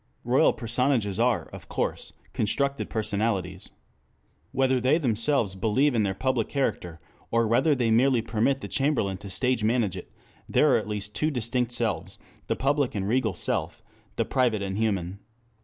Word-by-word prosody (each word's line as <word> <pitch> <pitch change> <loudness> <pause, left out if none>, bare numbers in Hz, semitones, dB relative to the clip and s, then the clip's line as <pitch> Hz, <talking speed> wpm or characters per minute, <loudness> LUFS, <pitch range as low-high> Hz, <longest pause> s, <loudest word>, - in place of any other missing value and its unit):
Royal 125 +2 +4
personages 115 -4 0
are, 120 -1 +2
of - - -12
course, - - -3 0.2
constructed 140 +6 -1
personalities. 100 -4 -2 0.8
Whether 130 -1 +2
they 130 +5 +3
themselves 120 - +1
believe 115 +9 +1
in 115 - +2
their 95 -2 0
public 130 -1 0
character, 90 - -2 0.3
or 115 0 +2
whether 130 +7 +3
they 120 -3 +1
merely 120 +1 +3
permit 130 +5 0
the - - -5
chamberlain 135 -9 0
to 100 0 -10
stage 125 +3 0
manage 110 -4 +1
it, - - -9 0.4
there - - +4
are - - +5
at - - -4
least 105 -1 -4
two 155 - 0
distinct 125 -2 -1
selves, 120 - -2 0.3
the - - 0
public 140 -2 0
and 100 -1 -2
regal 115 -3 +1
self, - - -2 0.3
the - - 0
private 120 -6 +1
and 95 +1 -3
human. 100 -4 -1
115 Hz, 160 wpm, -26 LUFS, 105-130 Hz, 0.8 s, are